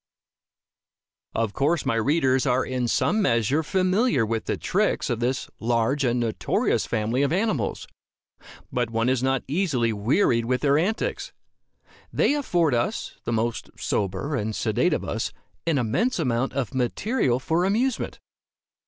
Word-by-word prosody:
Of 110 -3 0
course 150 +4 +1
my 130 - +1
readers 130 +2 +2
are 125 +1 +2
in 125 -2 -1
some 215 - +1
measure 125 - +2
familiar 185 - +2
with 115 0 -2
the - - -1
tricks - - 0
of 120 - -1
this 125 +2 -1
large 120 +4 +1
and 125 -1 +1
notorious 115 -2 0
family 115 +3 0
of 140 - +1
animals. 170 - -1 0.9
But 120 -2 0
one 115 +2 0
is 130 -1 +1
not 135 0 +1
easily 135 - +1
wearied 115 - +2
with 125 +1 0
their 145 0 +3
antics. 210 +7 -2 0.8
They - - +2
afford 175 - +1
us, 120 0 -2
the - - -2
most 115 +1 -1
sober 100 +9 -2
and 110 -3 -2
sedate - - +1
of - - -1
us, - - -3 0.3
an 160 -4 +2
immense 135 - +1
amount 125 -5 0
of 135 -2 -2
material 130 - 0
for 165 +6 0
amusement. 225 +7 0
130 Hz, 145 wpm, -25 LUFS, 115-160 Hz, 0.9 s, their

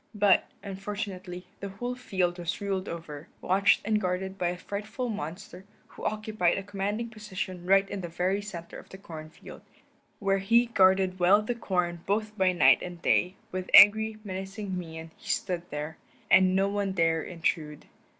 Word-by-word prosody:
But, 205 -2 +4 0.2
unfortunately, 195 -2 -6
the 200 - -5
whole 245 +6 -4
field 185 -8 -1
was 175 0 -3
ruled 195 -2 -2
over, 160 -2 -7
watched 195 +3 +3
and 215 0 +1
guarded 185 +1 -2
by 180 -2 -1
a 175 +1 -2
frightful 215 +6 -5
monster, 180 0 -6 0.3
who - - -12
occupied 215 -4 0
a 195 - -3
commanding 205 +3 -3
position 190 -5 -6
right 195 +1 +5
in 195 0 -5
the 175 - -4
very 180 +4 -1
center 175 -5 -8
of - - -16
the 190 - -10
corn 160 -5 -9
field, - - -13 0.6
where 195 -1 +1
he 230 +5 +4
guarded 190 -4 +3
well 195 +4 +5
the 245 - -1
corn 180 -7 -2
both 210 +2 -1
by 190 -3 +3
night 175 - +5
and 175 -1 -8
day; 180 +2 +2 0.2
with 185 0 -4
angry, 220 +1 +8
menacing 195 0 -5
mien 165 -2 -7
he - - -12
stood 180 -3 -1
there, 150 +2 -5 0.3
and 185 0 +6
no 195 +1 +3
one 200 -1 -1
dare 165 -2 +2
intrude. 160 -3 -3
190 Hz, 170 wpm, -28 LUFS, 175-205 Hz, 0.6 s, angry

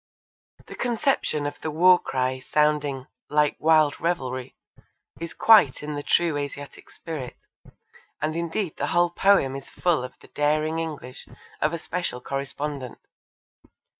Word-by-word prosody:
The - - -10
conception 240 - 0
of 145 - -5
the 160 - -3
war 180 +4 +5
cry 130 0 -2
sounding 145 -1 0 0.2
'like 150 0 +2
wild 155 -2 +4
revelrie' 130 -7 -2 0.6
is 170 0 -6
quite 210 -13 +5
in 150 0 -4
the 145 - -3
true 165 0 +2
Asiatic 145 0 -7
spirit, 150 -7 -7 0.8
and 155 +1 -2
indeed 170 +1 -2
the - - -1
whole 175 0 +2
poem 175 -8 +3
is 135 0 -8
full 170 -7 0
of 125 - -8
the - - -19
daring 155 +2 0
English 145 -6 -6 0.3
of 150 - +2
a 170 - -2
special 170 -5 -4
correspondent. 140 0 -5
150 Hz, 135 wpm, -25 LUFS, 140-170 Hz, 0.8 s, war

